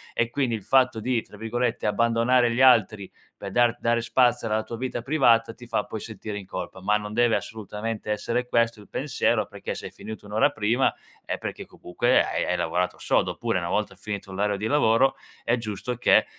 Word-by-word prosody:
e 115 0 0
quindi 130 -5 0
il 105 - -7
fatto 130 -2 +3
di 120 0 0
tra - - -15
virgolette, 115 +1 -2
"abbandonare 115 +3 +3
gli 120 - 0
altri", 110 -6 +4 0.3
per 100 -1 -6
dar 120 0 +3
dare 115 0 +1
spazio 120 0 +2
alla 110 0 0
tua 115 +2 -7
vita 125 -1 -3
privata 115 -5 +3
ti 120 +1 -13
fa 110 - -1
poi 110 - -6
sentire 105 -1 -6
in 95 - -10
colpa, 95 - -6
ma 105 +2 +2
non 105 0 -7
deve 120 0 +3
assolutamente 105 0 -5
essere 120 +3 -1
questo 115 -2 +1
il - - -17
pensiero - - 0
perché - - -6
se - - -8
hai - - -7
finito 110 -1 -9
1 105 - -10
ora 110 +7 +4
prima, 115 +1 +1 0.3
è - - -3
perché - - -6
comunque 120 +8 +1
hai - - -1
hai 90 - 0
lavorato 90 +2 -1
sodo, - - +1
oppure - - -1
una - - -4
volta - - -1
finito 100 -2 -6
l'orario 100 +1 0
di 105 - -4
lavoro, 135 -2 +3 0.3
è 120 - +3
giusto 115 +2 -4
che 125 - +4
115 Hz, 205 wpm, -25 LUFS, 105-120 Hz, 0.3 s, altri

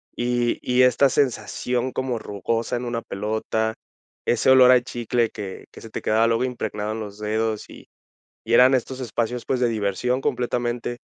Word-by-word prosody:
Y 120 0 0
y 125 0 +3
esta 130 +2 +4
sensación 125 -1 -1
como 130 -3 -2
rugosa 115 +4 -2
en 120 - -5
una 120 -1 -2
pelota, 110 +2 -2 0.5
ese 120 +2 +2
olor 130 -1 +8
a 125 -1 +6
chicle 120 -1 -1
que 100 -3 -8
que - - -13
se 115 - -10
te - - -5
quedaba 110 +1 +2
luego 115 +2 +1
impregnado 110 -4 -3
en 110 - -5
los 105 -1 -8
dedos, 110 0 -2
y - - -13 0.6
y 115 - -1
eran 130 +2 +7
estos 130 +1 -3
espacios, 120 0 -2
pues, 130 - 0
de 120 - +3
diversión 110 +4 -1
completamente. 120 -1 -2
120 Hz, 175 wpm, -23 LUFS, 110-125 Hz, 0.6 s, olor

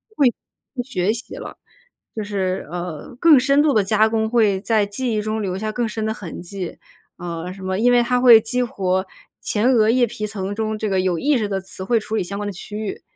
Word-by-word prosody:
会 280 - +4 0.5
会 250 - -2
学 210 -5 0
习 230 +2 -7
了。 - - -8 0.6
就 220 - -3
是， 195 -2 -2
呃， 175 - -6
更 315 -4 +7
深 275 +3 +3
度 300 -2 +3
地 215 - +3
加 215 +2 +3
工 220 0 0
会 215 -5 +3
在 215 -1 +2
记 230 +4 -3
忆 215 - 0
中 215 +1 -2
留 190 -2 -2
下 215 +2 -3
更 235 +1 -1
深 215 0 -3
的 220 - -1
痕 190 -7 -8
迹， 180 0 -6 0.4
呃， 175 0 -5
什 190 0 -11
么 190 +1 -2
因 245 +2 +4
为 245 0 +5
它 250 +1 +1
会 245 -3 +9
激 250 +3 -1
活 190 -5 -1 0.4
前 225 +5 +1
额 220 -4 +4
叶 245 +1 +4
皮 215 -1 -5
层 200 -2 -4
中 220 0 -2
这 215 0 -2
个 190 -1 +1
有 185 -2 +1
意 290 -1 +2
识 215 -3 -1
的 195 -1 -2
词 190 0 -8
汇 230 +4 +2
处 215 +1 -5
理 220 - 0
相 200 +3 -5
关 205 - -3
的 - - -3
区 200 +2 -9
域， 215 -2 -5
215 Hz, 255 characters per minute, -21 LUFS, 190-235 Hz, 0.6 s, 会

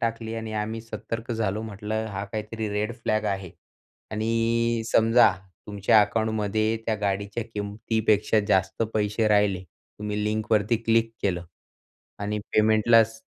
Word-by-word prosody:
टाकली 115 -1 -2
आणि 110 -1 -5
आम्ही 110 +1 -3
सतर्क 115 +1 -6
झालो. 110 -2 -1
म्हटलं 110 0 -4
हा 100 0 -4
काहीतरी 110 +2 -4
रेड 105 +3 -1
फ्लॅग 110 -3 -1
आहे 95 -3 -2 0.6
आणि 115 +1 0
समजा 115 +2 +6 0.4
तुमच्या 105 +1 +4
अकाउंटमध्ये 110 0 0
त्या 110 - +1
गाडीच्या 100 +2 -2
किमतीपेक्षा 105 +1 +1
जास्त 95 +2 +1
पैसे 105 +1 +1
राहिले, 105 -3 +2
तुम्ही 105 +4 -6
लिंकवरती 110 +1 +1
क्लिक 115 0 +3
केलं 90 -3 -1 0.8
आणि 105 +1 -2
पेमेंटलाच 110 +1 +4
110 Hz, 120 wpm, -25 LUFS, 105-115 Hz, 0.8 s, समजा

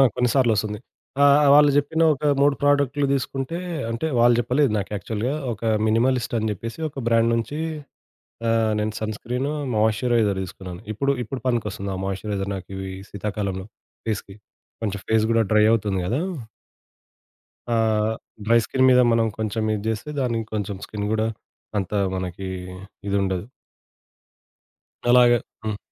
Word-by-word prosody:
కొన్ని 125 0 +2
సార్లు 130 -4 +4
వస్తుంది. 105 0 -2 0.4
ఆ! - - +7 0.2
ఆ! - - +4
వాళ్ళు 145 0 +7
జెప్పిన 160 +3 +2
ఒక 150 +1 -9 0.2
3 145 0 +4
ప్రొడక్టులు 145 0 +2
తీసుకుంటే, 135 +3 -2 0.3
అంటే 115 +7 -2
వాళ్ళు 120 0 +6
జెప్పలేదు 125 +2 +2
నాకు 100 0 -4
యాక్చువల్‌గా. 110 +5 -2 0.2
ఒక 110 - -12 0.2
మినిమలిస్ట్ 120 +2 +1
అని 110 0 0
చెప్పేసి 115 - -6
ఒక 140 - -8
బ్రాండ్ 115 0 +3
నుంచి 145 +7 -3 0.9
ఆహ్, 115 -1 +2
నేను 105 0 -1
సన్ 110 0 -2
స్క్రీన్, 125 +6 -3 0.3
మాయిశ్చరైజర్ 110 -1 +2
తీసుకున్నాను. 90 -1 -8
ఇప్పుడు, 140 +6 +1
ఇప్పుడు 125 +3 -5
పనికొస్తుంది 105 -5 -1
ఆ - - -3
మాయిశ్చరైజర్ 100 0 -3
నాకు 95 -2 -7
ఇవి 95 0 -5 0.2
శీతాకాలంలో 100 -2 -4 0.4
ఫేస్‌కి. 100 -2 -3 0.5
కొంచెం 100 -2 -2
ఫేస్ 110 -1 +3
గూడా 115 0 +4
డ్రై 105 -1 +5
అవుతుంది 105 -4 +1
కదా! 120 +10 0 1.5
ఆహ్, 110 -1 +2 0.3
డ్రై 115 +2 +5
స్కిన్ 130 0 +2
మీద 125 0 +6
మనం 115 0 +3
కొంచెం 110 0 -2
ఇది 105 - -2
జేస్తే, 110 +7 -2
దానికి 115 -3 -1
కొంచెం 105 -1 -2
స్కిన్ 105 -1 -4
గూడా 110 0 +1 0.5
అంత 95 0 -2 0.2
మనకి 95 +1 -4 0.6
ఇదుండదు. 100 -2 0 1.6
అలాగ 125 0 +7 0.3
హ్మ్. 105 -1 -2
110 Hz, 140 wpm, -23 LUFS, 105-125 Hz, 1.6 s, ఆ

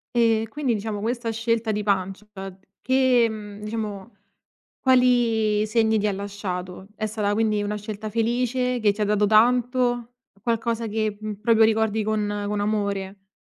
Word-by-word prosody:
Ehm, 225 -1 +3
quindi 260 0 -1
diciamo 210 0 -4
questa 230 +1 -2
scelta 225 0 0
di 210 0 -1
pancia 195 0 -1 0.5
che 260 -2 +3
mhmm, 210 -2 -8
diciamo: 210 -1 -5 0.6
quali 235 -5 +3
segni 220 0 +2
ti 210 - 0
ha 210 - +2
lasciato? 190 -2 -5
È 215 - -2
stata 210 -1 -1
quindi 215 -1 +1
una 205 +1 -2
scelta 210 +1 -6
felice 245 +2 0
che 215 -2 +3
ti 205 +2 -6
ha - - +3
dato 210 0 +2
tanto? 245 +2 +2 0.3
Qualcosa 230 0 -1
che, 215 -1 -2
mhmm, 215 0 -4
proprio 225 0 +4
ricordi 220 -1 +1
con 205 -1 -1
con 205 0 -2
amore? 200 -2 -2
215 Hz, 150 wpm, -24 LUFS, 205-230 Hz, 0.6 s, proprio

